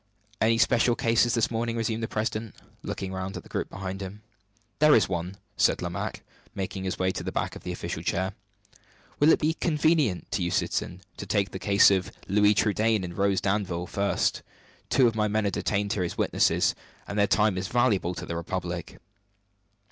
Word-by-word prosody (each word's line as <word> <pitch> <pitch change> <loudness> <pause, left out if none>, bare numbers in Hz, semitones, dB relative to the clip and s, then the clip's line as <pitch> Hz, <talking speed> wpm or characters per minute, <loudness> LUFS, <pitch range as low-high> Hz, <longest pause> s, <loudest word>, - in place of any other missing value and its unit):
"Any 115 +1 +4
special 115 +2 +3
cases 115 +1 +2
this 115 -1 +1
morning?" 115 0 -1
resumed 115 0 -1
the 115 - -2
president, 110 0 -3 0.3
looking 95 -1 -5
round 95 +1 -4
at - - -8
the - - -16
group - - -3
behind 95 0 -6
him. 100 +3 -8 0.6
"There 150 0 +7
is 105 - +4
one," 90 +1 -4 0.2
said - - +3
Lomaque, - - -4 0.3
making 95 0 -4
his 95 - -2
way 95 0 +1
to - - -5
the - - -4
back - - -2
of - - -9
the - - -5
official - - -5
chair. 95 +2 -1 0.9
"Will 145 - +5
it - - +5
be 155 +1 +1
convenient 155 - +1
to 100 - -1
you, 85 - 0
citizen, 90 +1 -2 0.2
to - - -7
take 100 -2 0
the 95 - -6
case 100 +1 +5
of 95 -2 0 0.2
Louis 105 +1 +4
Trudaine 110 0 +2
and 85 -1 -6
Rose 100 0 +1
Danville 95 -3 -1
first? 100 +2 0 0.5
Two 130 0 +4
of 115 - 0
my 105 -1 +1
men 105 0 0
are 100 - +1
detained 100 +1 -1
here 100 - -2
as 85 - -3
witnesses, - - +2 0.3
and 100 - -3
their 100 - +4
time 105 -2 +3
is 95 0 -3
valuable 105 -7 +1
to 85 +2 -6
the 85 - -4
Republic." 85 0 -4
100 Hz, 195 wpm, -27 LUFS, 95-115 Hz, 0.9 s, There